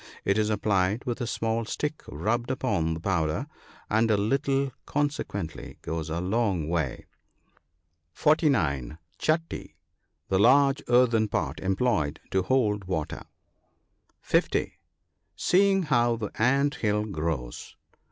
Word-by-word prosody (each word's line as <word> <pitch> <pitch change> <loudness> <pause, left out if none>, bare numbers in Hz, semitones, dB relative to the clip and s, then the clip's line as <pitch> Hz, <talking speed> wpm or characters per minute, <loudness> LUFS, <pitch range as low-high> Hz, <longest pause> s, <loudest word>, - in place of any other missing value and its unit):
It 100 +2 +2
is 105 0 +1
applied 105 0 +1
with 125 +1 -3
a 120 - -1
small 115 0 -1
stick 150 +7 -3
rubbed 115 - -1
upon 85 -11 0
the - - -6
powder, 85 - 0 0.4
and 110 +1 +2
a 105 - +4
little 135 +5 +1 0.2
consequently 140 - -3
goes 80 -1 -3
a 80 +2 -2
long 95 -3 0
way. 80 -6 -2 1.1
(49 90 - +1
) - - -39
Chatty. 160 +1 -1 0.3
— - - -50
The 95 - +2
large 135 +5 +5
earthen 120 -3 +4
pot 100 - -2
employed 95 -6 0
to 95 - +2
hold 105 -3 +1
water. 90 -5 -3 1.0
(50.) - - 0 0.6
Seeing 190 - +3
how 120 -6 +2
the 110 -3 -5
ant 140 +4 +3
hill 105 -1 +1
grows. 80 - -4
110 Hz, 125 wpm, -27 LUFS, 85-130 Hz, 1.1 s, large